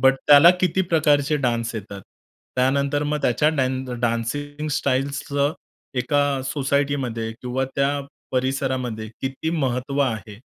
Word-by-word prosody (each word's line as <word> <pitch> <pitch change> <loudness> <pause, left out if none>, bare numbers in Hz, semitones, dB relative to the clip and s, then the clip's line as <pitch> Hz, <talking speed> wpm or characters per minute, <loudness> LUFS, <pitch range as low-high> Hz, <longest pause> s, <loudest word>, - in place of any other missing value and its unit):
But 135 0 +5
त्याला 145 +4 +9
किती 185 +1 +2
प्रकारचे 150 -3 +2
डान्स 120 -4 -1
येतात? 100 -2 -7 0.6
त्यानंतर 140 +3 +1
मग 150 0 -1
त्याच्या 125 +5 +3
ड 130 0 -1
डान्सिंग 145 +6 -2
स्टाइल्सचं 140 +2 0 0.5
एका 145 +4 +1 0.3
सोसायटीमध्ये 135 -5 -1
किंवा 125 +1 -1
त्या 140 0 +2 0.4
परिसरामध्ये 130 -4 -1
किती 135 +4 -3
महत्त्व 135 -3 -1
आहे? 110 -6 -2
135 Hz, 115 wpm, -23 LUFS, 125-145 Hz, 0.6 s, त्याला